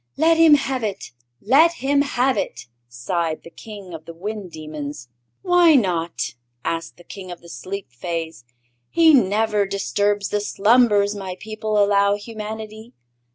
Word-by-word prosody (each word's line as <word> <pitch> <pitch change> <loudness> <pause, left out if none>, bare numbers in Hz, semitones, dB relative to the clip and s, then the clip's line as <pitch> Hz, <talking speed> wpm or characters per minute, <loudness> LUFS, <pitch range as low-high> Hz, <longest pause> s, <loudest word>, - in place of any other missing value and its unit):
"Let 325 +2 +4
him 325 -2 +7
have 270 -3 -2
it 200 - -4 0.3
let 300 +10 +5
him 280 -2 +1
have 265 -2 +1
it!" 120 +2 -4 0.2
sighed 155 +7 -3
the 170 - -12
King 200 -2 -11
of 160 -1 -9
the 165 0 -10
Wind 205 +2 -6
Demons. 150 -5 -7 0.3
"Why 355 -3 +5
not?" 175 -8 0 0.3
asked 165 0 -3
the 175 - -16
King 190 0 -10
of 175 -1 -8
the 170 - -14
Sleep 195 -3 -7
Fays. 165 0 -5 0.5
"He 325 -2 +5
never 210 -3 +2
disturbs 205 +1 -1
the 210 - -1
slumbers 210 -1 +3
my 190 -3 -6
people 215 0 -3
allow 200 0 +3
humanity. 220 +1 -8
205 Hz, 150 wpm, -21 LUFS, 175-230 Hz, 0.5 s, him